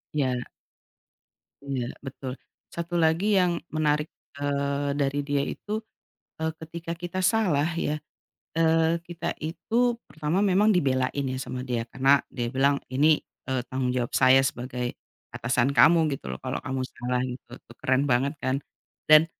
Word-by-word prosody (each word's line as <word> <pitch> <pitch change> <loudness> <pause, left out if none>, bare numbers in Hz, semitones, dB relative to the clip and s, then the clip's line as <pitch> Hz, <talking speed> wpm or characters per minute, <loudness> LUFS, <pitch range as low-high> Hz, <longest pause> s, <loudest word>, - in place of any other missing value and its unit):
Ya. 130 -4 0 1.2
Iya, 135 -3 -2 0.2
betul. 130 -1 -6 0.4
1 170 +1 -3
lagi 160 +3 +3
yang 180 -1 +2 0.2
menarik, 150 -1 +1 0.2
eee, 140 0 -1
dari 140 0 +1
dia 145 0 0
itu, 215 +1 -4 0.6
eee, 160 0 +1
ketika 165 +1 -6
kita 175 +2 -4
salah 185 -7 +3 0.2
ya, 150 - 0 0.6
eee, 165 0 +3
kita 170 0 -4
itu 235 +9 0
pertama 155 +6 0
memang 200 +2 +4
dibelain 140 -6 +1
ya, - - -3
sama 125 0 -5
dia 120 -3 -1
karena 135 +2 +4
dia 120 -3 -3
bilang, 140 +2 +3 0.2
"Ini, 150 +3 +5 0.3
eee, 130 -1 +1
tanggung 130 0 -2
jawab 120 -2 -1
saya 130 +1 +6
sebagai 125 -1 -3 0.4
atasan 125 +3 +1
kamu, 165 -2 +6
gitu 100 - -6
loh, 65 - -4
kalau - - -4
kamu 130 0 -3
salah", 125 0 -2
gitu. 125 0 -7
Itu - - -17
keren 130 +1 +2
banget 135 +2 +2
kan. 130 +1 -1 0.5
Dan, 155 +1 +9
140 Hz, 145 wpm, -26 LUFS, 130-165 Hz, 1.2 s, Dan